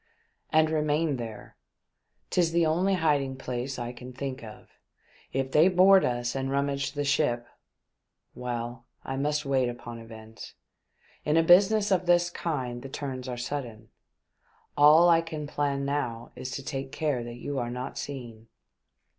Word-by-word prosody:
" - - -46
And 155 0 +4
remain 150 -1 +1
there. 115 -3 -8 0.7
'Tis 170 -2 +2
the 170 -1 +3
only 180 +5 +2
hiding 145 -6 +1
place 130 0 -4
I 120 0 -4
can 125 +1 -10
think 135 0 -5
of. 110 -1 -12 0.6
If 135 0 -2
they 155 +5 +6
board 190 +1 +6
us 120 0 -1
and 135 0 -2
rummage 140 0 -1
the 145 - -2
ship 135 -4 +1 0.5
— - - -56 0.3
well, 120 0 -5 0.2
I 135 - -4
must 150 +2 -1
wait 130 -2 +2
upon 120 -1 -8
events. 110 -1 -11 0.7
In 150 +2 +2
a 165 - +5
business 200 +4 +5
of 185 -2 +2
this 175 0 +4
kind 130 -9 -3
the 135 - -8
turns 130 -2 -5
are 125 - -4
sudden. 120 -4 -5 0.9
All 150 +3 +7
that 175 - +7
I 165 - +4
can 160 -2 -6
plan 140 -1 -1
now 125 -5 -3
is 130 - -6
to 140 - -5
take 135 -1 -5
care 145 -6 -1
that 120 0 -8
you 140 +2 -3
are 120 -1 -2
not 125 +1 -5
seen." 120 -5 -7
140 Hz, 165 wpm, -28 LUFS, 120-155 Hz, 0.9 s, All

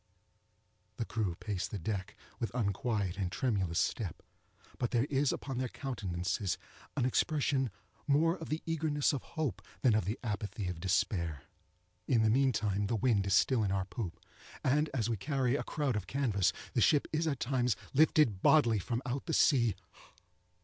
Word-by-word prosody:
The 115 - -2
crew 105 -8 -2
pace 100 0 -3
the 105 - -5
deck 100 +3 -4 0.2
with 115 - -1
unquiet 100 -3 -1
and 95 -2 -1
tremulous 95 -7 0
step; 100 -9 -1 0.6
but 120 - 0
there 120 0 +2
is 140 -1 +2
upon 135 -3 -4
their 130 - 0
countenances 100 -7 -2 0.4
an 130 - +2
expression 135 -1 +1 0.4
more 160 +4 +3
of 165 - -8
the 155 +1 -2
eagerness 155 -3 +1
of 135 - -2
hope 150 - -3 0.2
than 125 -4 +5
of 110 -4 +2
the 105 +5 -2
apathy 105 -2 -3
of 90 -2 -5
despair. 85 -4 0 0.6
In 115 -3 +3
the 110 - +4
meantime 110 -6 +2
the 115 - 0
wind 110 -4 +2
is 95 - +3
still 125 +3 +4
in 100 - 0
our 95 -1 0
poop, 95 -4 -5 0.4
and, 150 +3 +2
as 115 -5 0
we 115 -2 -1
carry 135 +2 0
a - - 0
crowd 145 -6 -1
of 105 -3 -3
canvas, 115 -9 +1 0.2
the - - +2
ship 145 - +4
is 160 +1 +1
at 140 -4 -1
times 125 -3 +1 0.2
lifted 140 -8 +4
bodily 120 -9 +5
from 120 +6 -3
out 125 +2 -3
the 165 - -1
sea! 120 - +4
115 Hz, 170 wpm, -32 LUFS, 100-135 Hz, 0.6 s, than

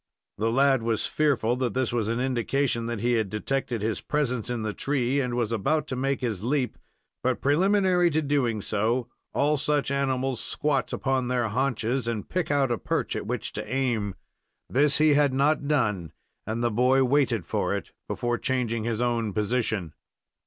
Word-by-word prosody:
The 115 +2 +1
lad 135 0 +4
was 115 -1 0
fearful 130 -6 +1
that 125 -4 -1
this 130 -2 0
was 115 -3 0
an 115 +2 -1
indication 125 -1 0
that 115 -3 -3
he 120 - +1
had 110 -4 +1
detected 120 +1 -2
his 110 -1 -1
presence 125 -6 -1
in 120 -2 -2
the 105 -1 -2
tree 135 +1 0
and 125 -2 -2
was 120 -2 0
about 140 +8 +1
to 130 - -2
make 135 +1 -1
his 110 -6 -2
leap; 130 +1 -1 0.4
but, 125 0 0
preliminary 180 +3 +3
to 155 0 0
doing 125 -7 0
so, 115 +4 0 0.2
all 150 +1 +2
such 145 0 0
animals 135 -2 0
squat 145 -3 0
upon 130 -2 0
their 125 -2 0
haunches, 125 0 -1
and 115 -4 -3
pick 180 -2 -1
out 140 -3 +2
a 120 - 0
perch - - -1
at - - -4
which - - -3
to - - -5
aim. 120 -7 0 0.5
This 140 +3 +3
he 155 0 +5
had 145 -2 +3
not 140 +1 +2
done, 105 - 0 0.3
and 115 +2 -2
the 120 - +2
boy 125 +4 +3
waited 130 - +2
for - - -1
it - - -6 0.2
before 120 0 -1
changing 115 -4 -1
his 115 -1 -1
own 115 -4 0
position. 105 -6 -1
125 Hz, 180 wpm, -26 LUFS, 115-140 Hz, 0.5 s, he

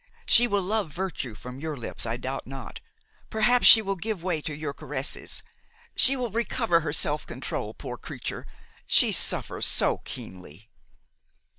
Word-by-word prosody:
She 240 +1 +6
will 200 -4 0
love 205 -2 -1
virtue 165 - -4
from 125 +4 -10
your 155 -1 -5
lips, 120 -1 -4
I 115 +2 -2
doubt 130 +2 -5
not; 135 -2 -8 0.5
perhaps 240 +3 +4
she 220 - +10
will 195 -1 -2
give 195 -1 -5
way 175 -4 -1
to 155 0 -5
your 150 -1 -5
caresses; 135 0 -5 0.5
she 270 - +6
will 245 -4 -3
recover 230 -4 +1
her 155 -2 -3
self 150 0 +1
control, - - -5
poor - - -7
creature! - - -7 0.4
she - - +6
suffers - - +1
so - - +2
keenly!" 90 +2 -10
160 Hz, 155 wpm, -26 LUFS, 135-215 Hz, 0.5 s, she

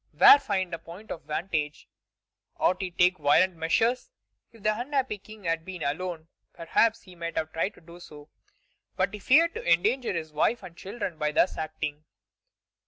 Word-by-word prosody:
Where 285 - +9
find 190 -7 -2
a 165 - -3
point 175 +7 -11
of - - -5
vantage? 155 -2 -3 0.7
Ought 185 +2 +1
he 190 - -2
to 175 - -30
take 180 -1 +4
violent 170 +5 +4
measures? 225 - +1 0.4
If 225 -3 -18
the 215 0 +2
unhappy 260 -4 -1
King 215 +1 -14
had 165 -1 -1
been 180 -2 -7
alone, 160 +2 -3 0.3
perhaps 220 +7 +1
he 185 - -14
might 170 -1 -6
have 160 0 -2
tried 175 +5 -1
to - - -18
do 170 +1 -14
so. 150 -4 -13 0.7
But - - 0
he 210 - -6
feared 325 +10 +4
to - - -6
endanger 220 +9 +2
his 160 -4 -4
wife 200 +9 +1
and 175 -2 -10
children 195 -3 -6
by 150 -1 0
thus 175 - +2
acting. 155 -1 -4
180 Hz, 180 wpm, -27 LUFS, 160-210 Hz, 0.7 s, Where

